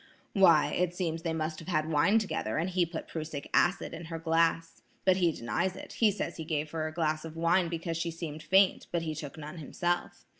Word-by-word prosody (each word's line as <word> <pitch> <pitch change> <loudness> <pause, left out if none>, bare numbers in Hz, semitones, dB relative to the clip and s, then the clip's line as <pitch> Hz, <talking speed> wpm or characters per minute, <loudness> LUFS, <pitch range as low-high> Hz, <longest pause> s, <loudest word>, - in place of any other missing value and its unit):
"Why, 170 -7 +5
it 175 0 0
seems 165 -3 -2
they 165 -1 -2
must 155 -1 -2
have 165 - -11
had 155 -4 0
wine 165 +8 +4
together 190 - -1
and 170 +4 0
he 180 -1 +2
put 165 -1 -6
prussic 155 -3 -5
acid 185 +3 +2
in 165 +1 -7
her 165 0 -5
glass. 165 0 +1 0.2
But 185 -1 +5
he 175 -3 +3
denies 160 +8 -2
it; - - -9
says 210 -3 0
he 160 - -4
gave 155 -2 -2
her 160 -1 -2
a - - -5
glass 155 -1 -1
of 160 -1 -8
wine 170 +1 +3
because 165 0 -3
she 170 0 -1
seemed 160 -2 -6
faint, 190 +5 +3
but 170 -1 0
he 160 -1 -2
took 150 -1 -7
none 155 +2 -8
himself. 175 +3 -2
165 Hz, 220 wpm, -30 LUFS, 155-175 Hz, 0.2 s, Why